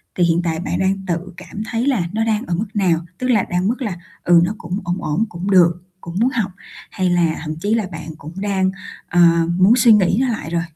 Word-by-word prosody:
thì 180 - +2
hiện 170 0 +2
tại 165 -2 -1
bạn 175 - -3
đang 190 0 0
tự 175 +2 -3
cảm 210 - -7
thấy 230 +2 -1
là 260 -9 +2
nó 225 +1 0
đang 220 +1 0
ở 170 - -1
mức 205 +6 -2
nào? 185 -6 +2 0.2
Tức 255 - -3
là 215 -6 +3
đang 180 +1 0
ở - - +1
mức 245 +5 -1
là, 205 -8 -3 0.3
ừ, 175 -1 +5
nó 175 - 0
cũng 180 +2 -4
ổn 175 +1 -2
ổn, 155 +9 0
cũng 175 +3 -4
được, 175 -2 +4 0.2
cũng 170 +1 -8
muốn 240 +3 +3
học, 215 -7 -2 0.4
hay 185 -2 0
là 175 -2 +2
thậm 155 -1 -4
chí 205 +7 -1
là 220 -3 0
bạn 160 -2 -8
cũng 155 +2 -10
đang, 190 -2 0 0.4
ờ, 175 - 0 0.4
muốn 190 +5 +5
suy 235 -2 +5
nghĩ 195 -2 +3
nó 265 - +2
lại 215 -10 -3
rồi? 170 0 0
185 Hz, 250 wpm, -19 LUFS, 170-210 Hz, 0.4 s, ừ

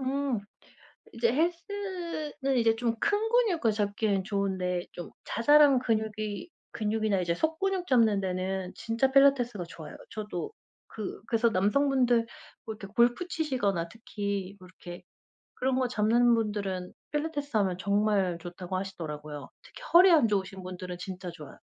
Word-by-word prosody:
음. 265 -3 -1 0.7
이제 230 0 +1
헬스는 335 -4 -2
이제 225 -1 +3
좀 230 -1 0
큰 410 - +2
근육을 375 - +3
잡기엔 205 -1 0
좋은데 190 -3 -1
좀 175 - -8
자잘한 285 +1 +5
근육이 215 - -2 0.2
근육이나 215 -2 0
이제 170 -1 0
속근육 355 - -1
잡는 225 -6 +4
데는 185 0 -2
진짜 230 +4 0
필라테스가 260 -8 +4
좋아요. 165 -2 -10
저도 210 - -5 0.3
그 215 -3 -6
그래서 230 0 +2
남성분들 240 +3 +2 0.4
뭐 220 - -4
이렇게 200 -2 -9
골프 240 +9 +3
치시거나 210 - -1
특히 200 -3 -4
뭐 185 - -13
이렇게 175 0 -10 0.5
그런 260 0 0
거 255 -1 +1
잡는 235 +1 +3
분들은 200 -5 -2 0.2
필라테스 295 -4 -2
하면 190 -3 +1
정말 200 -2 +1
좋다고 180 +2 -6
하시더라고요. 150 -6 -6
특히 - - -14
허리 365 +2 +9
안 290 -9 +5
좋으신 195 -2 -2
분들은 180 -1 -7
진짜 185 -1 -6
좋아요. 150 -4 -11
215 Hz, 320 characters per minute, -29 LUFS, 190-265 Hz, 0.7 s, 허리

